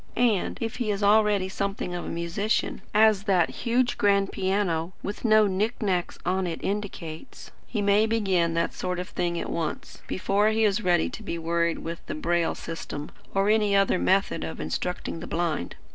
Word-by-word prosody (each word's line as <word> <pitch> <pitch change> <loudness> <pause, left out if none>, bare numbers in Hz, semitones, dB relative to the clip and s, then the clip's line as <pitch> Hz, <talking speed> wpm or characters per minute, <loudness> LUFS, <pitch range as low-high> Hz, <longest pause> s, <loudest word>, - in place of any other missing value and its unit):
And, 230 -5 +1
if 225 -1 -3
he 240 -4 -1
is 205 0 -1
already 205 -2 +4
something 195 -2 -3
of 175 - -4
a - - -5
musician, 170 +6 -1
as 215 -1 +4
that 185 -5 +3
huge 245 +1 0
grand 200 -1 +3
piano, 185 -3 0
with 205 - -5
no 215 -2 +5
knick 205 +5 -1
knacks 185 -5 -1
on 185 0 +1
it 165 - -4
indicates, 195 -2 -5 0.2
he 210 -3 -2
may 205 +2 +4
begin 190 -7 +1
that 170 0 0
sort 180 -1 -3
of 180 +1 -5
thing 170 -1 -1
at - - -4
once, 160 -2 -4
before 200 +3 +2
he 220 0 +1
is 210 +1 +2
ready 175 -4 +2
to - - -8
be 190 -6 -4
worried 170 0 0
with 165 0 -6
the - - -3
Braille 170 +2 0
system, 150 -3 -6 0.2
or 195 +1 +3
any 210 -2 +3
other 195 -2 +3
method 195 - +2
of 80 0 -5
instructing 165 - -3
the - - -7
blind. 165 - -2
195 Hz, 185 wpm, -26 LUFS, 170-210 Hz, 0.2 s, no